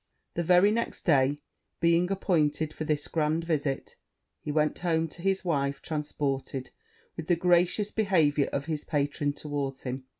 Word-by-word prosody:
The 170 Hz, -, -1 dB
very 180 Hz, +4 st, +5 dB
next 230 Hz, +2 st, -2 dB
day 145 Hz, -2 st, +2 dB, 0.4 s
being 170 Hz, +1 st, +3 dB
appointed 155 Hz, -5 st, +1 dB
for 155 Hz, -, -5 dB
this 150 Hz, -1 st, -1 dB
grand 155 Hz, +1 st, 0 dB
visit, 150 Hz, -5 st, -2 dB, 0.4 s
he 150 Hz, -, -4 dB
went 150 Hz, 0 st, +1 dB
home 165 Hz, -2 st, +1 dB
to 170 Hz, -, -10 dB
his 190 Hz, 0 st, 0 dB
wife, 140 Hz, -4 st, 0 dB
transported 140 Hz, -3 st, -3 dB, 0.4 s
with -, -, -6 dB
the 175 Hz, -, +4 dB
gracious 180 Hz, +4 st, +2 dB
behaviour 160 Hz, -9 st, +2 dB
of 140 Hz, 0 st, -2 dB
his 155 Hz, -2 st, -3 dB
patron 145 Hz, -1 st, -1 dB
towards 145 Hz, -2 st, -4 dB
him. 130 Hz, 0 st, -5 dB
155 Hz, 155 wpm, -28 LUFS, 145-175 Hz, 0.4 s, very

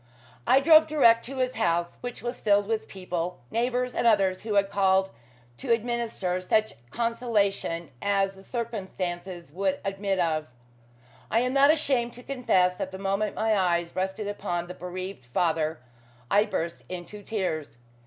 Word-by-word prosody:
I 260 Hz, +3 st, +6 dB
drove 315 Hz, +1 st, +7 dB
direct 235 Hz, -7 st, +5 dB
to 270 Hz, +2 st, -7 dB
his 255 Hz, 0 st, 0 dB
house, 175 Hz, -7 st, 0 dB
which 245 Hz, -1 st, -6 dB
was 240 Hz, +1 st, -4 dB
filled 205 Hz, -1 st, +3 dB
with 220 Hz, +1 st, -2 dB
people 180 Hz, -2 st, -4 dB
neighbours 250 Hz, +2 st, 0 dB
and -, -, +1 dB
others 195 Hz, -4 st, +3 dB
who 215 Hz, -2 st, -3 dB
had 200 Hz, 0 st, +3 dB
called 190 Hz, -1 st, +3 dB, 0.5 s
to 115 Hz, -, -3 dB
administer 230 Hz, -6 st, -1 dB
such 215 Hz, +4 st, +1 dB, 0.2 s
consolation 210 Hz, -, -1 dB
as 195 Hz, -1 st, +1 dB
the 195 Hz, -, -15 dB
circumstances 185 Hz, -, -5 dB
would 190 Hz, +3 st, -1 dB
admit 195 Hz, 0 st, -1 dB
of. 160 Hz, -3 st, 0 dB, 0.8 s
I 230 Hz, -, +3 dB
am 250 Hz, +1 st, 0 dB
not 275 Hz, +1 st, +6 dB
ashamed 270 Hz, -6 st, +2 dB
to 245 Hz, -, -10 dB
confess 185 Hz, -10 st, +2 dB
that 190 Hz, -, -3 dB
the 190 Hz, -, -8 dB
moment 195 Hz, +2 st, -1 dB
my 220 Hz, 0 st, +2 dB
eyes 175 Hz, -3 st, +1 dB
rested 190 Hz, +2 st, -2 dB
upon 175 Hz, -4 st, -3 dB
the 180 Hz, -, -8 dB
bereaved 180 Hz, -5 st, -7 dB
father 160 Hz, +2 st, 0 dB, 0.5 s
I 205 Hz, +1 st, +5 dB
burst 170 Hz, -5 st, -3 dB
into 185 Hz, +3 st, -7 dB
tears. 180 Hz, -, -3 dB
195 Hz, 155 wpm, -27 LUFS, 180-230 Hz, 0.8 s, drove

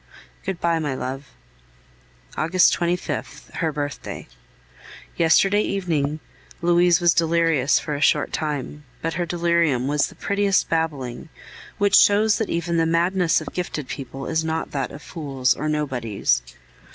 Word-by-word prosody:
Good 190 Hz, -3 st, -4 dB
bye, 170 Hz, -1 st, +1 dB
my 145 Hz, -4 st, -2 dB
love. 135 Hz, +2 st, -5 dB, 1.1 s
August 175 Hz, +3 st, +3 dB
25th 175 Hz, +1 st, -3 dB
(her 160 Hz, -3 st, 0 dB
birthday). 145 Hz, -1 st, -5 dB, 0.9 s
Yesterday 195 Hz, +5 st, +4 dB
evening 160 Hz, -8 st, -1 dB, 0.4 s
Louise 175 Hz, 0 st, +4 dB
was 175 Hz, -2 st, +4 dB
delirious 165 Hz, -4 st, +2 dB
for 150 Hz, -, -3 dB
a 145 Hz, -, -3 dB
short 145 Hz, 0 st, +2 dB
time; 150 Hz, -1 st, -3 dB, 0.2 s
but 165 Hz, 0 st, -1 dB
her 175 Hz, 0 st, -2 dB
delirium 170 Hz, -6 st, +1 dB
was 145 Hz, +1 st, +1 dB
the -, -, -14 dB
prettiest 200 Hz, -1 st, +1 dB
babbling, 150 Hz, -5 st, -2 dB, 0.5 s
which 205 Hz, -1 st, +1 dB
shows 210 Hz, +1 st, +5 dB
that 220 Hz, -, -2 dB
even 170 Hz, 0 st, -1 dB
the 165 Hz, 0 st, +2 dB
madness 170 Hz, +1 st, +2 dB
of 155 Hz, -, -8 dB
gifted 155 Hz, -6 st, -4 dB
people 135 Hz, 0 st, -6 dB
is 160 Hz, 0 st, 0 dB
not 160 Hz, 0 st, -3 dB
that 135 Hz, -2 st, -2 dB
of 145 Hz, -, -11 dB
fools 140 Hz, -6 st, -1 dB
or 155 Hz, +2 st, -3 dB
nobodies. 125 Hz, -, 0 dB
160 Hz, 140 wpm, -23 LUFS, 145-175 Hz, 1.1 s, shows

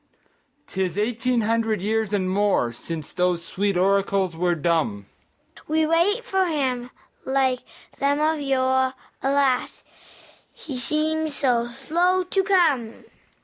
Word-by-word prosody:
'Tis 185 Hz, -2 st, -3 dB
eighteen 235 Hz, +3 st, 0 dB
hundred 225 Hz, 0 st, 0 dB
years 215 Hz, +2 st, -1 dB
and 195 Hz, -3 st, 0 dB
more 195 Hz, -12 st, +1 dB
Since 155 Hz, +4 st, -7 dB
those 180 Hz, -2 st, 0 dB
sweet 200 Hz, +1 st, -1 dB
oracles 195 Hz, -1 st, +1 dB
were 175 Hz, +1 st, +1 dB
dumb; 150 Hz, -, 0 dB, 0.6 s
We 315 Hz, +1 st, +2 dB
wait 345 Hz, +9 st, +2 dB
for 380 Hz, -1 st, +1 dB
Him, 260 Hz, -6 st, -1 dB, 0.3 s
like 265 Hz, -1 st, +1 dB, 0.4 s
them 280 Hz, +1 st, +1 dB
of 310 Hz, 0 st, +1 dB
yore; 260 Hz, -1 st, +1 dB, 0.3 s
Alas, 270 Hz, -2 st, +1 dB, 0.7 s
He 275 Hz, -6 st, -7 dB
seems 310 Hz, +2 st, -1 dB
so 240 Hz, -4 st, +1 dB
slow 345 Hz, +9 st, +1 dB
to 385 Hz, +2 st, 0 dB
come! 315 Hz, -, +1 dB
250 Hz, 120 wpm, -24 LUFS, 195-300 Hz, 0.7 s, We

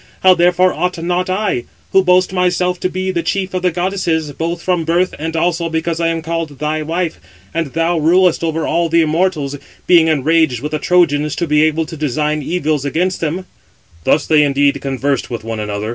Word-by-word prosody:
How 185 Hz, 0 st, +7 dB
therefore 180 Hz, +1 st, +3 dB
ought 180 Hz, 0 st, -2 dB
not 180 Hz, +2 st, -1 dB
I, 190 Hz, -, -1 dB, 0.3 s
who 190 Hz, -, +4 dB
boast 180 Hz, +1 st, +3 dB
myself 180 Hz, 0 st, 0 dB
to 185 Hz, -, -1 dB
be 185 Hz, +1 st, -3 dB
chief 190 Hz, +2 st, -2 dB
of 185 Hz, -, -1 dB
the 180 Hz, -, +2 dB
goddesses, 175 Hz, -3 st, -1 dB
both 165 Hz, +4 st, -3 dB
from 175 Hz, -1 st, 0 dB
birth 175 Hz, +3 st, +1 dB
and 160 Hz, +1 st, -4 dB
also 170 Hz, 0 st, 0 dB
because 160 Hz, +1 st, -2 dB
I 165 Hz, -, +1 dB
am 165 Hz, -1 st, -2 dB
called 165 Hz, -3 st, -4 dB
thy 155 Hz, +2 st, -2 dB
wife 165 Hz, +2 st, -2 dB, 0.3 s
(and 165 Hz, -2 st, -1 dB
thou 165 Hz, +1 st, +1 dB
rulest 175 Hz, +2 st, +3 dB
over 160 Hz, -1 st, -1 dB
all 170 Hz, -1 st, 0 dB
the 165 Hz, +1 st, +3 dB
immortals), 155 Hz, -3 st, 0 dB, 0.3 s
being 170 Hz, -3 st, +5 dB
enraged 155 Hz, -3 st, +2 dB
with 150 Hz, +2 st, -4 dB
the 155 Hz, -, -2 dB
Trojans, 150 Hz, -5 st, +2 dB
to 170 Hz, -, -1 dB
[be 150 Hz, -1 st, +2 dB
able 160 Hz, +1 st, +1 dB
to] 160 Hz, -, -8 dB
design 150 Hz, +1 st, -1 dB
evils 155 Hz, -2 st, -1 dB
against 175 Hz, +6 st, -1 dB
them." 170 Hz, +4 st, -2 dB, 0.6 s
Thus 145 Hz, -, +2 dB
indeed 145 Hz, -2 st, +4 dB
they -, -, -7 dB
conversed 135 Hz, 0 st, -2 dB
with 115 Hz, -2 st, -5 dB
one 115 Hz, -1 st, -4 dB
another. 105 Hz, 0 st, -3 dB
165 Hz, 195 wpm, -16 LUFS, 150-180 Hz, 0.6 s, How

